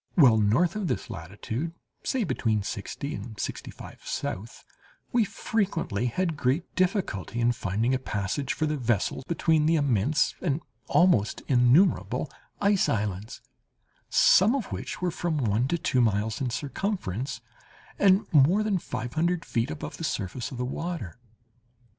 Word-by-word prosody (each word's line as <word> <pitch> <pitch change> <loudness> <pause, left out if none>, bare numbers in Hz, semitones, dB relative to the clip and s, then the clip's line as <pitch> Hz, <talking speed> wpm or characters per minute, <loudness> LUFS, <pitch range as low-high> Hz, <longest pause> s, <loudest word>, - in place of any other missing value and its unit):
While 130 -10 +7
north 120 - +3
of 210 -4 -2
this 125 - -3
latitude, 110 - -5 0.3
say 260 -3 0
between 110 - 0
sixty 120 +8 -5
and 110 +1 -7
sixty - - -4
five - - -11
south, 110 +5 -5 0.5
we 240 -1 +4
frequently 185 - -1
had 165 +6 -1
great 140 +5 -1
difficulty 180 - 0
in 120 0 +3
finding 115 +1 0
a 130 - +1
passage 105 +4 -2
for 155 - -1
the 150 0 -1
vessel 120 -2 0
between 160 -2 +2
the 165 - +4
immense 145 +1 +2
and 155 -3 0 0.3
almost 170 - +3
innumerable 130 +8 +3 0.3
ice 200 -1 +3
islands, 105 -1 -2 0.7
some 215 +8 +5
of 255 -7 -3
which - - -5
were 180 - +1
from 165 -2 -2
one 120 -1 +1
to 170 - 0
two 130 -5 +1
miles 110 0 +1
in 130 - 0
circumference, 135 - -3 0.6
and 195 +1 +5
more 160 +9 +5
than 205 -3 +1
five 120 -6 -5
hundred 170 +2 0
feet 115 +3 -1
above 155 -1 -6
the - - -6
surface 115 - -3
of 130 - -8
the 125 - -2
water." 155 - -5
135 Hz, 150 wpm, -27 LUFS, 110-175 Hz, 0.7 s, While